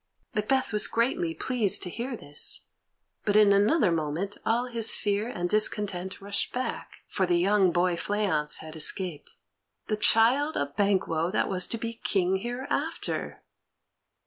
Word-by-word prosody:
Macbeth 255 +4 0
was 210 - +5
greatly 325 +9 0
pleased 235 -7 +2
to 180 - -4
hear 240 +3 -4
this, 145 -5 -1 0.6
but 205 - 0
in 210 -1 +6
another 205 - +3
moment 165 +5 -2
all 235 +2 +1
his 230 -3 +2
fear 205 +2 -1
and 175 -7 -3
discontent 195 -2 0
rushed 200 +1 -2
back, 250 -1 -5
for 190 -2 -1
the 175 -1 +2
young 190 +1 +3
boy 175 0 +1
Fleance 180 -6 -1
had 160 0 -9
escaped. 160 -1 -2 0.5
The 215 - -2
child 245 +8 +3
of 140 0 -3
Banquo 185 -5 +1
that 200 - 0
was 185 -1 +1
to 230 - -2
be 230 0 -4
King 190 -1 +1
hereafter! 245 +6 -4
205 Hz, 145 wpm, -27 LUFS, 180-230 Hz, 0.6 s, in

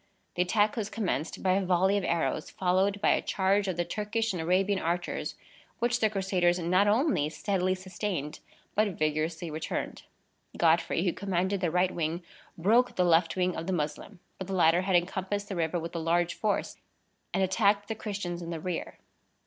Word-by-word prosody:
The 175 - 0
attack 205 +4 +2
was 215 -3 -3
commenced 200 -8 -3
by 185 - +3
a 195 +1 +2
volley 185 +2 +3
of 200 - 0
arrows, 165 -3 -1
followed 190 +2 +1
by - - +4
a - - +2
charge 195 +1 +1
of 185 -3 -2
the 175 - 0
Turkish 215 +4 -2
and 175 - -3
Arabian 190 +4 +2
archers, 175 +1 -2 0.4
which 240 +1 +1
the 220 - +3
Crusaders 185 -3 +1
not 185 +3 +2
only 215 - +2
steadily 185 +2 0
sustained, 185 -5 -4 0.3
but 205 -4 +1
vigorously 155 +2 -1
returned. 155 +1 -4 0.6
Godfrey, 165 0 +2
who 180 - +1
commanded 190 0 -1
their 175 - +1
right 180 +2 +2
wing, 165 +1 -2 0.3
broke 230 +8 +3
the 180 - +2
left 165 -1 +3
wing 180 -1 0
of 165 - -5
the 190 - 0
Moslem; 155 +4 -4 0.2
but 190 - -5
the 195 - -4
latter 170 0 +4
had 190 0 +1
encompassed 190 +3 -1
the 195 - -3
river 170 0 0
with 165 +1 -6
a - - -1
large 170 +1 +1
force, 215 -2 -1 0.5
and 195 - +1
attacked 200 +1 +2
the 220 - -2
Christians 200 -5 -4
in 170 - -6
the 165 -1 -4
rear. 175 +1 -4
185 Hz, 185 wpm, -29 LUFS, 170-200 Hz, 0.6 s, by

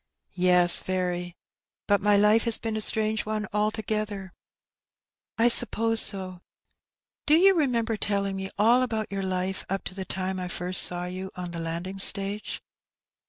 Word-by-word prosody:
" - - -47 0.2
Yes, 175 -1 +6
very; 180 -1 -4 0.5
but 205 0 +1
my 205 0 +2
life 210 +3 +2
has 230 -2 +5
been 225 -1 -5
a 215 - -4
strange 215 0 +1
one 215 0 -4
altogether." 210 -2 -4 1.0
"I 230 +1 +2
suppose 225 -1 +3
so. 185 -3 0 0.9
Do 300 - +4
you 385 +4 +4
remember 235 - -1
telling 200 -1 -2
me 190 0 -6
all 230 +5 +3
about 220 -5 -4
your 195 0 -4
life 185 0 -4
up 195 +1 -4
to - - -6
the 190 0 -6
time 185 0 -5
I 180 - -5
first 180 +1 +1
saw 175 0 +3
you 185 +1 -7
on 180 -1 -7
the 170 - -7
landing 170 +4 -6
stage 200 +1 +2
200 Hz, 165 wpm, -25 LUFS, 185-220 Hz, 1.0 s, Yes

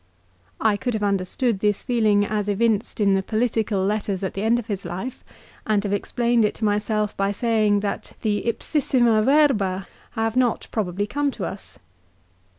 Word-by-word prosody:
I 215 -2 +2
could 245 +1 -2
have 210 - -2
understood 200 +3 0
this 205 0 0
feeling 215 -5 +2
as 210 -1 -2
evinced 220 +2 0
in 200 -2 +3
the 195 - +2
political 215 -2 0
letters 200 -2 -1
at 190 - -2
the 195 - -4
end 225 +2 +3
of 240 - -4
his 200 -4 -4
life, 185 +9 -6 0.4
and 210 -2 +2
have 200 -1 -1
explained 235 +3 +1
it 210 - +1
to 220 - -2
myself 210 0 0
by 195 0 0
saying 215 -2 +2
"that 205 - -4
the 210 -2 +1
"ipsissima 240 -3 +2
verba" 215 -9 +2 0.3
have 225 -1 -1
not 250 -2 +1
probably 205 -2 -1
come 285 +6 -1
to 220 -9 -5
us. 190 +3 -8
215 Hz, 170 wpm, -23 LUFS, 200-235 Hz, 0.4 s, in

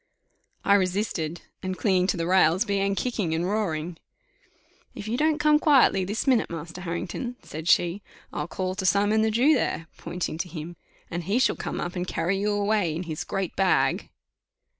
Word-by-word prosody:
I 200 - +5
resisted, 185 -4 0 0.2
and, 185 -1 -3
clinging 185 -3 +2
to 180 - 0
the 165 - -1
rails, 185 +2 +4
began 200 -1 0
kicking 205 -9 -1
and 170 +2 -1
roaring. 175 -5 -2 1.0
"If 205 - -7
you 225 - -1
don't 305 +3 +2
come 300 0 +4
quietly 270 -11 +4
this 205 +4 -2
minute, 255 -4 +3
Master 165 +2 -7
Harrington," 180 +8 -4
said 160 +2 -7
she, 175 +4 +3 0.3
"I'll - - -3
call 185 -1 -3
to 190 0 -4
Simon 205 +3 +3
the 220 - +2
Jew 250 +8 +4
there," 225 - 0
pointing 175 -2 -4
to 180 - -3
him, 165 +1 -7 0.4
"and 175 -1 -4
he 205 +6 +1
shall 260 - +3
come - - -4
up 175 +1 -4
and 180 0 -3
carry 180 +4 -1
you 205 +1 0
away 205 -5 +1
in 170 - -3
his 160 -3 -4
great 195 -3 -3
bag." 190 -1 +2
190 Hz, 185 wpm, -26 LUFS, 170-215 Hz, 1.0 s, I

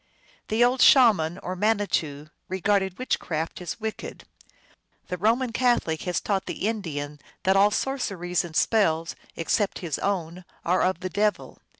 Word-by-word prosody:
The 220 +2 +2
old 250 +1 +2
Shaman 195 - +5
or 185 - -4
Manitou 185 -8 -1 0.2
regarded 190 0 0
witchcraft 165 -10 -3
as 175 +5 -5
wicked. 220 0 -6 0.9
The 180 - -3
Roman 230 +5 +2
Catholic 235 -10 +1
has 175 - 0
taught 195 -2 -2
the 200 - -2
Indian 150 -9 -4 0.2
that 190 +1 +3
all 200 +1 +6
sorceries 200 -8 -1
and 170 -2 -9
spells 165 -8 +2 0.2
except 195 +5 0
his 155 -5 -2
own 180 -3 -2 0.2
are 180 +2 +2
of 185 -1 0
the 185 - -3
devil. 210 +2 -1
190 Hz, 140 wpm, -25 LUFS, 165-220 Hz, 0.9 s, all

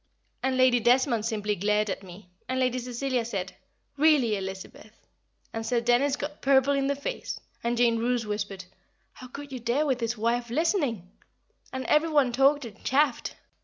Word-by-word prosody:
and 265 -1 0
Lady 255 -1 +5
Desmond 240 -1 +3
simply 210 -2 -1
glared 210 +2 +1
at 195 - -3
me, 185 +1 -12 0.2
and 260 0 -1
Lady 255 -1 +1
Cecilia 250 0 -2
said, 195 -5 -4 0.4
"Really, 280 -7 +4
Elizabeth!" 195 +3 -8 0.5
and 225 - -3
Sir 240 +1 +1
Dennis 245 +4 +2
got 295 +1 -6
purple 275 0 +4
in 275 -1 +1
the 280 - +1
face, 285 - -5 0.2
and 235 +1 0
Jane 235 -1 +3
Roose 240 0 0
whispered, 205 -2 -4 0.5
"How 255 - -11
could 280 +3 -9
you 260 - -5
dare 240 +6 0
with 265 -4 0
his 230 0 -2
wife 235 +2 0
listening!" 265 - 0 0.6
and 260 0 -4
every 305 +2 +3
one 290 -5 +3
talked 275 +3 +3
and 215 -3 -12
chaffed. 275 -1 +1
245 Hz, 170 wpm, -27 LUFS, 225-275 Hz, 0.6 s, Lady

